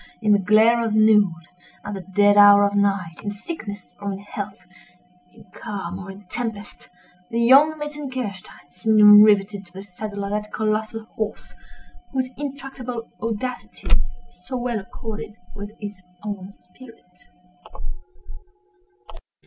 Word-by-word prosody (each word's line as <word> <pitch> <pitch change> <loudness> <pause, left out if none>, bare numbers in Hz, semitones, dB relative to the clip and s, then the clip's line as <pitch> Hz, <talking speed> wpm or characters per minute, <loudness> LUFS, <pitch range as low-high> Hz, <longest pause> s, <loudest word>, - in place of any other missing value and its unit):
In 215 -2 +1
the 205 - +5
glare 220 +4 +4
of 220 -2 -1
noon—at 200 -3 +1
the 195 - -5
dead 205 +2 +3
hour 205 0 +8
of 200 - 0
night—in 200 -2 0
sickness 205 - -7
or 200 0 -2
in - - -5
health—in 180 -3 -11
calm 195 -4 -6
or 195 0 -9
in 195 +1 -11
tempest—the 205 -2 -7
young 275 +6 +6
Metzengerstein 260 - -6
seemed 210 +5 +7
rivetted 205 -1 +3
to 175 - -19
the 190 +1 -8
saddle 200 +1 -6
of 200 - -4
that 210 0 -3
colossal 220 +1 -2
horse, 215 -1 -5 0.6
whose 260 -1 -1
intractable 265 -4 -6
audacities 230 - -2 0.3
so 255 +6 -4
well 240 -2 -2
accorded 220 0 -7 0.2
with 205 0 -7
his 205 -3 -7 0.2
own 200 -2 -6
spirit. 180 -2 -19
210 Hz, 120 wpm, -23 LUFS, 195-230 Hz, 0.6 s, hour